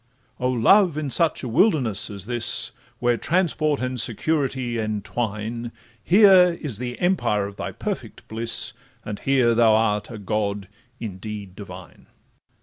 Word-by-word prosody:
'Oh 125 - 0
Love! 155 - +4
in 150 -3 -3
such 165 -1 +1
a - - -3
wilderness 120 - +2
as 100 -2 -8
this, 120 0 0 0.3
Where 120 -1 +1
transport 155 -3 +1
and 130 -2 -1
security 130 -1 -1
entwine, 110 +2 -3 0.3
Here 185 -3 +6
is 125 -9 -5
the 125 -1 -5
empire 175 - +1
of 100 0 -9
thy - - -4
perfect - - -6
bliss, 115 0 -1 0.3
And 105 -1 -5
here 130 -4 +2
thou 115 -1 +4
art 105 -1 +1
a 115 - -7
god 100 -1 -2 0.3
indeed 100 -2 -7
divine. 95 -3 -11
115 Hz, 140 wpm, -23 LUFS, 105-140 Hz, 0.3 s, Here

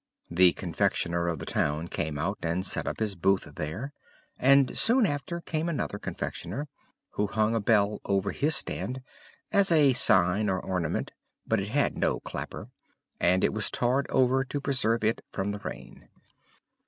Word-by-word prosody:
The 90 +1 +5
confectioner 85 0 -1
of 85 -1 -1
the - - -7
town 75 +3 -1
came 75 -3 -3
out, 100 +8 -2
and 85 +3 -1
set - - -2
up - - -3
his 110 -2 0
booth 95 +1 0
there; 105 - -5 0.5
and 135 0 +4
soon 240 +1 +3
after 170 +1 -3
came 165 0 -2
another 140 -10 -3
confectioner, 105 - -5 0.4
who 105 - -1
hung 110 +3 +1
a 115 - +1
bell 105 -1 +2
over 100 0 0
his 155 +3 +1
stand, 130 +1 -3 0.5
as 200 -2 +4
a 150 -5 +5
sign 100 -3 +4
or 95 -1 0
ornament, 90 -5 -2 0.3
but 110 - +1
it 100 - -4
had 140 +5 0
no - - +1
clapper, - - -7 0.5
and 90 +1 +2
it - - +2
was - - 0
tarred 130 +3 0
over 130 +1 +3
to 145 +2 -4
preserve 115 -5 0
it 110 +2 +1
from 95 +2 -2
the 105 - -5
rain. - - -9
105 Hz, 165 wpm, -28 LUFS, 95-135 Hz, 0.5 s, The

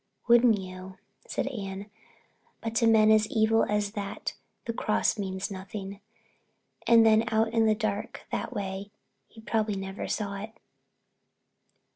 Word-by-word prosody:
"Wouldn't 235 -2 +6
you," 185 0 -9 0.3
said - - -2
Anne, 200 -4 -6 0.7
"but 225 -1 -4
to 230 - +4
men 220 -1 +6
as 215 0 +4
evil 225 0 +3
as 210 -1 0
that 200 -2 -5 0.3
the 230 - -2
cross 215 0 0
means 190 0 -3
nothing. 195 +1 -7 0.9
And 230 -1 +7
then 220 0 +5
out 220 0 +2
in 225 -1 +3
the 215 - +4
dark 210 +1 -3
that - - -3
way, 195 0 -4 0.4
he 225 - -15
probably 220 -2 0
never 195 0 -5
saw 200 -2 -2
it." 220 +2 -8
210 Hz, 140 wpm, -28 LUFS, 195-225 Hz, 0.9 s, And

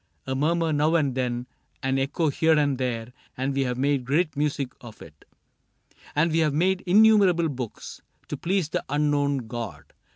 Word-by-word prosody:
^ - - -46 0.2
A 130 - -2
murmur 160 +4 +1
now 150 +3 +2
and 145 -5 +2
then, 125 -1 -2 0.4
an 135 0 +1
echo 145 +4 0
here 160 +3 +3
And 145 -3 +1
there, 120 -2 -3 0.2
and 135 +2 -1
we 135 0 0
have 125 -1 -2
made 140 0 +1
great 155 +5 0
music 145 -2 -1
of 115 -3 -11
it; 75 -2 -15 0.9
And 160 +3 +2
we 165 - +2
have 155 -3 +1
made 185 +4 +2
innumerable 195 -4 +5
books 125 -5 -7 0.3
To - - -3
please 185 -3 -1
the - - -2
Unknown 145 -2 +1
God. 115 +1 -7
145 Hz, 175 wpm, -25 LUFS, 130-160 Hz, 0.9 s, innumerable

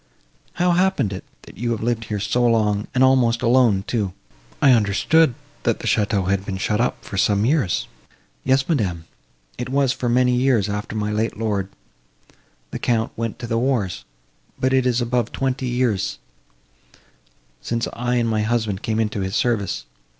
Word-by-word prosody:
"How 180 0 +2
happened 180 - +1
it, 95 - -6 0.2
that - - -14
you 120 +1 -1
have 110 - -4
lived 115 -1 -1
here 105 -1 -3
so 120 +4 0
long, 105 -3 +2
and 130 - +4
almost 125 -3 +3
alone, 115 -5 +4
too? 105 -7 -1 0.5
I 140 - +6
understood, 120 +6 +3 0.3
that - - +1
the - - -9
château 100 -3 +1
had 95 0 +1
been 95 -1 -4
shut 105 +3 0
up 125 - -2
for 100 - -6
some 100 +1 +2
years?" 130 - +1 0.6
"Yes, 135 0 +2
madam, 95 - -1 0.6
it 125 - -4
was 135 -1 +2
for 125 - -2
many 125 +1 +3
years 125 -5 +2
after 105 +1 -4
my 105 -1 -1
late 110 +1 -1
lord, 105 -4 -1 1.0
the - - -4
Count, 115 -2 0
went 115 0 -3
to 120 - -6
the 115 -1 0
wars; 120 -8 -1 0.6
but 130 0 +1
it 130 -1 +3
is 125 0 +1
above 120 -1 0
twenty 130 -1 -2
years, 120 -5 0 1.4
since 115 0 -2
I 120 +1 -1
and 120 -1 +1
my 110 -1 0
husband 110 -3 -1
came 110 0 -1
into 105 -2 -1
his 95 0 -2
service. 115 -5 0
115 Hz, 170 wpm, -22 LUFS, 105-125 Hz, 1.4 s, I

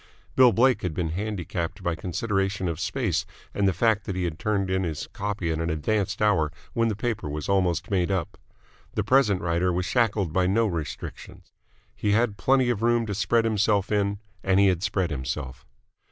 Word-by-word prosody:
Bill 130 -2 +7
Blake 125 +5 +3
had 90 -4 -3
been 85 -3 -1
handicapped 95 -1 -4
by 85 - 0
consideration 95 +2 -1
of 85 -2 -3
space 105 - -1 0.3
and 100 -1 +1
the - - +4
fact 110 +3 +1
that 95 - -3
he 95 - -1
had 85 -2 -3
turned 100 -3 0
in 95 0 +1
his 80 -4 -3
copy 100 -4 -2
at 80 - -2
an 80 +1 -1
advanced 100 +6 -1
hour 80 -8 +3 0.2
when 115 0 +2
the 110 - -1
paper 110 -7 -3
was 75 +1 -4
almost 90 -2 +1
made 90 -2 +1
up. 95 -3 -2 0.6
The - - +1
present 115 -8 +3
writer 85 +1 +1
was 90 +1 -1
shackled 105 -6 +1
by 90 0 +2
no 115 +5 +3
restrictions. 85 -7 -6 0.4
He 105 - 0
had 110 -1 +2
plenty 130 +2 +3
of 110 -3 -3
room 120 0 +2
to 105 - -3
spread 105 +4 +2
himself 105 -2 +1
in, 100 -1 +1 0.3
and 95 0 +3
he 100 -1 +6
had 90 -2 0
spread 95 -3 0
himself. 65 -2 -5
95 Hz, 195 wpm, -26 LUFS, 85-105 Hz, 0.6 s, Bill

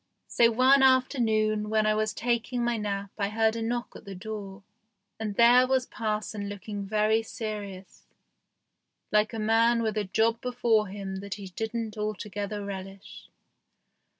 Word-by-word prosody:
So 235 -1 +4
one 260 +4 +5
afternoon 220 -5 +2
when 215 0 +2
I 215 - +3
was 215 0 0
taking 240 +2 -1
my 240 0 +1
nap 200 -2 -3
I 200 0 0
heard 220 +1 +1
a 230 - -3
knock 240 +1 -3
at - - -11
the 195 -1 -8
door, 200 0 -7 0.6
and 210 -2 -3
there 245 +3 +6
was 260 -1 +1
parson 210 -2 -3
looking 205 0 -6
very 215 +2 +2
serious, 205 -4 -7 1.0
like 210 0 +3
a 225 - -5
man 230 +2 +3
with 220 -1 -1
a 210 - -2
job 225 +4 +1
before 235 -4 +1
him 190 0 -6
that 200 0 -5
he 200 -2 -9
didn't 220 +2 -4
altogether 210 0 -4
relish. 195 0 -9
215 Hz, 150 wpm, -27 LUFS, 205-230 Hz, 1.0 s, there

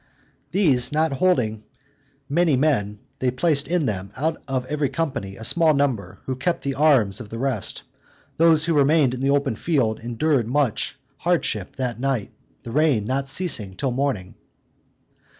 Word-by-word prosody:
These 150 -9 +2
not 155 +1 +1
holding 125 -9 +1 0.6
many 160 +1 +2
men, 105 -8 0 0.2
they 130 - +1
placed 140 +3 +1
in 175 -2 0
them, 100 -4 -3
out 160 +4 -1
of 130 -2 -2
every 145 0 -1
company, 135 -12 -3
a 110 - -10
small 160 +5 +4
number, 135 -7 -1
who 130 - -2
kept 155 +7 -2
the 140 - -1
arms 135 -9 +3
of 110 - -10
the 115 - -6
rest: 125 -6 -2 0.5
those 160 -1 +4
who 170 - +1
remained 145 -2 +3
in 130 - -5
the 135 - +1
open 140 -3 +1
field 120 -5 0
endured 120 +2 0
much 130 -2 0 0.2
hardship - - -1
that 125 -3 -3
night, 130 -5 -1 0.3
the 115 - -7
rain 145 -6 +2
not 135 +3 -1
ceasing 135 - 0
till 130 +6 -1
morning. 125 -8 -2
135 Hz, 160 wpm, -23 LUFS, 115-155 Hz, 0.6 s, small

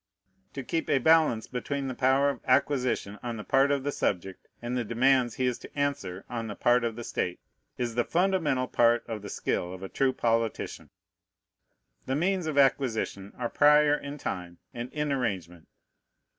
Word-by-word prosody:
To 135 - -5
keep 165 +5 -2
a - - +4
balance 155 -5 +4
between 135 +2 -3
the 130 - -3
power 135 +2 +3
of - - -9
acquisition 125 -6 +1
on 120 -2 -4
the 105 - -6
part 135 +4 +3
of 140 -2 0
the 145 - -1
subject 95 -6 -2
and 120 +1 -4
the 125 - 0
demands 120 +1 +2
he 130 - 0
is 125 -2 -1
to - - -13
answer 140 -10 -2
on 115 -2 -4
the 105 - -6
part 120 0 +3
of 115 -2 -1
the 120 - -6
state 90 -5 -3 0.4
is 120 -2 -2
the 120 +1 +1
fundamental 165 -8 +1
part 120 -1 +3
of 110 -3 -5
the 100 - -8
skill 90 -1 -2
of 95 0 -8
a 95 - -6
true 135 -1 +1
politician. 115 -3 -1 1.2
The 130 - 0
means 180 +2 0
of 150 -2 -2
acquisition 120 -7 +1
are 120 - -1
prior 150 +2 +5
in 145 0 -4
time 90 -9 -5 0.2
and 120 +2 -6
in 150 -1 -2
arrangement. 95 - -3
125 Hz, 185 wpm, -28 LUFS, 115-140 Hz, 1.2 s, prior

